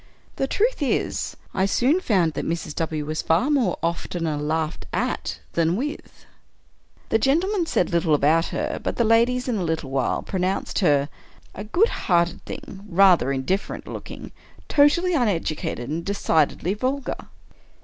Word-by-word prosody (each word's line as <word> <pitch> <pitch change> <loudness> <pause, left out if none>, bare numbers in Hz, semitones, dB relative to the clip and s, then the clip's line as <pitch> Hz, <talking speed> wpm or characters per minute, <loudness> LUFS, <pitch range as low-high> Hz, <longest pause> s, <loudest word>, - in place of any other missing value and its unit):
The 270 - 0
truth 450 - 0
is, 280 - -1 0.2
I 190 +1 +1
soon 265 - +2
found 180 - +2
that - - -3
Mrs. 165 -2 -3
W. 155 -2 -2
was 155 +1 -2
far 175 - +2 0.3
oftener 165 -1 -2
laughed 155 +2 -2
at - - -2 0.2
than 170 +2 +1
zvith. 290 +5 -6 0.8
The 220 - +3
gentlemen 340 - +1
said 180 - +1
little 170 -2 +3
about 155 +4 +3
her; - - -3
but - - -2
the 235 - +2
ladies, 235 +3 +3
in 240 -3 0
a 190 - -1
little 160 -5 -2
while, 135 -2 0
pronounced 185 0 -1
her 145 -7 +3 0.2
" - - -28
a 200 - -6
good 350 - +2
hearted 170 -2 0
thing, 195 0 -8
rather 180 -6 +5
indifferent 140 +9 -2
looking, - - -8 0.4
totally 310 +5 +4
uneducated, 170 - -1
and 160 +4 -3
decidedly 180 -2 +1
vul 260 +6 -1
gar." - - -6
185 Hz, 150 wpm, -23 LUFS, 160-250 Hz, 0.8 s, rather